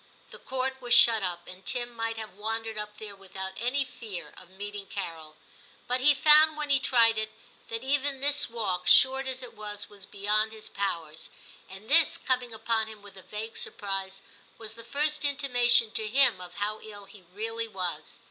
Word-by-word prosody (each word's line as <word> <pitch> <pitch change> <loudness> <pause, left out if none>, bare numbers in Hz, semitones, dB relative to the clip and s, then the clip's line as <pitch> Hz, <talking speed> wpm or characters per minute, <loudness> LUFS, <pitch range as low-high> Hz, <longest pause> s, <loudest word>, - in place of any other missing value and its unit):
The - - -10
Court 265 0 -3
was 245 -1 +3
shut 225 -2 +7
up, 175 -2 -4
and 185 +1 -12
Tim 240 +1 -2
might 225 0 -3
have 220 -1 -8
wandered 225 +2 -4
up 210 0 -5
there 210 -2 -7
without 190 -1 -6
any 260 +4 0
fear 220 -7 -9
of 180 - -13
meeting 200 +1 -8
Carol. 160 -6 -7 0.5
But 250 +1 0
he 290 +2 +5
found, 305 +2 +7
when 300 -1 -2
he 275 - +5
tried 230 -3 +4
it, 220 0 -3 0.4
that 230 +1 -6
even 275 0 -1
this 285 0 +2
walk, 195 -6 -3
short 265 0 +6
as 260 0 -3
it 250 - -11
was, 210 -1 -7
was 200 -2 -12
beyond 210 +2 0
his 220 -1 -11
powers, 165 -6 -4 0.4
and 195 +3 -12
this, 320 +4 +4
coming 250 -2 -2
upon 225 0 -1
him 215 -2 -12
with 200 -1 -12
a 190 - -12
vague 215 +4 -7
surprise, 195 -2 -2 0.3
was 220 -1 -6
the 230 +1 -12
first 300 +5 0
intimation 245 -5 +4
to 220 -1 -1
him 240 -4 +3
of 180 -1 -11
how 210 +1 -2
ill 205 -2 -11
he 200 0 -16
really 225 +6 -6
was. 180 -7 -3
220 Hz, 190 wpm, -27 LUFS, 200-255 Hz, 0.5 s, shut